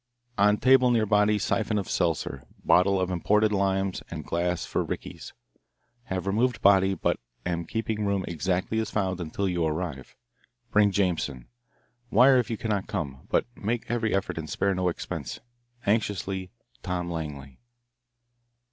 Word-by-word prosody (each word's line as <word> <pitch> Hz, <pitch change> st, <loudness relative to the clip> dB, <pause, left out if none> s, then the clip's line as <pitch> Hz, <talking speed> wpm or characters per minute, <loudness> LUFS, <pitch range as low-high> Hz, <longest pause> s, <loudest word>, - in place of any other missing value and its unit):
On 105 Hz, 0 st, +4 dB
table 130 Hz, +1 st, +5 dB
near 115 Hz, -3 st, +3 dB
body 105 Hz, 0 st, +3 dB
siphon 105 Hz, +1 st, 0 dB
of 100 Hz, -, -2 dB
seltzer, 70 Hz, -, -1 dB, 0.2 s
bottle 95 Hz, +2 st, +4 dB
of 95 Hz, 0 st, -1 dB
imported 105 Hz, +4 st, +2 dB
limes, 95 Hz, -1 st, 0 dB
and -, -, -6 dB
glass 90 Hz, +1 st, -1 dB
for -, -, -1 dB
rickeys. -, -, -6 dB, 0.7 s
Have 95 Hz, 0 st, -3 dB
removed 115 Hz, +5 st, +1 dB
body, 95 Hz, -1 st, +5 dB
but -, -, 0 dB, 0.3 s
am 85 Hz, -1 st, -2 dB
keeping 110 Hz, +2 st, -2 dB
room 100 Hz, -2 st, 0 dB
exactly 90 Hz, +5 st, -1 dB
as 110 Hz, -1 st, -2 dB
found 95 Hz, -4 st, -1 dB
until 85 Hz, +4 st, -2 dB
you 90 Hz, -2 st, 0 dB
arrive. 80 Hz, -4 st, -3 dB, 0.6 s
Bring 105 Hz, -1 st, +5 dB
Jameson. 85 Hz, -10 st, -1 dB, 0.6 s
Wire 130 Hz, +4 st, +6 dB
if 120 Hz, -, -1 dB
you 115 Hz, -, -2 dB
cannot 105 Hz, -3 st, -2 dB
come, 70 Hz, -9 st, -5 dB
but -, -, +2 dB
make 115 Hz, +2 st, -3 dB
every 115 Hz, -2 st, 0 dB
effort 95 Hz, -3 st, -2 dB
and 80 Hz, -1 st, -6 dB
spare 100 Hz, +7 st, +1 dB
no 90 Hz, -1 st, +1 dB
expense. 80 Hz, -6 st, -5 dB, 0.5 s
Anxiously, 100 Hz, -3 st, -1 dB, 0.3 s
Tom 90 Hz, +2 st, -3 dB
Langley." 70 Hz, -5 st, -6 dB
95 Hz, 145 wpm, -27 LUFS, 90-105 Hz, 0.7 s, Wire